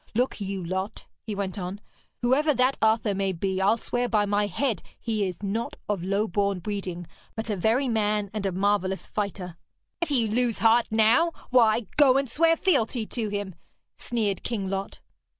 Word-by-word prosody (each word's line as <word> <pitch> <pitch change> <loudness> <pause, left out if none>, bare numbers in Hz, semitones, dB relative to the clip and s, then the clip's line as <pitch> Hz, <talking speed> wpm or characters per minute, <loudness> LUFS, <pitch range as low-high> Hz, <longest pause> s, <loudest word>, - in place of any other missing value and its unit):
Look 245 -2 0
you, 195 -2 -3
Lot,' 190 +4 -4 0.2
he 215 - -5
went 200 0 -3
on, 185 +2 -5 0.4
'whoever 285 +5 +3
that 255 +2 +3
Arthur 220 -1 +3
may 195 -1 0
be, 190 +2 -1
I'll 200 +4 +4
swear 245 +1 -2
by 210 -2 +2
my 205 0 +1
head 225 0 -1 0.2
he 215 -4 -1
is 185 +2 -7
not 215 +4 -2
of 200 -4 -1
low 200 +3 0
born 200 +1 0
breeding, 180 -2 -4 0.3
but 220 0 -3
a - - 0
very 225 +8 +2
man 210 -3 0
and 215 -2 -3
a - - -1
marvellous 190 0 0
fighter.' 190 -4 -4 0.4
'If 345 - 0
you 245 -6 +2
lose 235 +1 +1
heart 230 +1 +4
now, 230 +10 +4 0.2
why, 230 -2 +5 0.2
go 270 -3 +6
and 275 0 +1
swear 330 +6 +3
fealty 250 - +1
to 220 -1 -3
him!' 205 -2 -3 0.4
sneered 210 -6 -2
King 200 -5 -3
Lot. 195 0 -4
210 Hz, 180 wpm, -26 LUFS, 195-235 Hz, 0.4 s, go